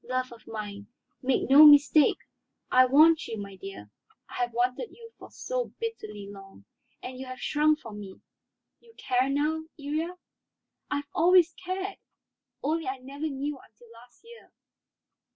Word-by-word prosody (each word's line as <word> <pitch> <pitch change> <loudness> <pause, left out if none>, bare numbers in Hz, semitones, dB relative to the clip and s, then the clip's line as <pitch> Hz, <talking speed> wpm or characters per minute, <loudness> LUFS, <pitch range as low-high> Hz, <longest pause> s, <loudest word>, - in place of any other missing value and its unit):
"Love 255 0 -3
of 235 - -15
mine, 205 -2 -7 0.3
make 260 0 0
no 280 +3 +8
mistake. 295 0 +7 0.5
I 255 0 +6
want 310 +4 +5
you; 225 - -5
my 200 -1 -8
dear, 185 - -10 0.4
I - - -15
have 245 0 -1
wanted 250 - -1
you 460 -1 -14 0.2
so - - -4
bitterly 215 - -6
long, 195 - -13 0.4
and 255 0 -7
you 265 - -7
have 255 0 -8
shrunk 305 +1 +1
from 210 -2 -9
me. 195 -2 -10 0.6
You 460 -1 -22
care 255 +1 0
now, 305 +3 0 0.2
Iría?" 310 +5 -3 0.7
"I - - -1
have 285 0 -4
always 345 0 +4
cared, 375 +3 -5 0.7
only 315 +1 -1
I 260 +1 -2
never 280 +4 -6
knew 280 0 -4
until 230 0 -20
last 235 - -18
year. 470 0 -16
275 Hz, 150 wpm, -27 LUFS, 230-315 Hz, 0.7 s, no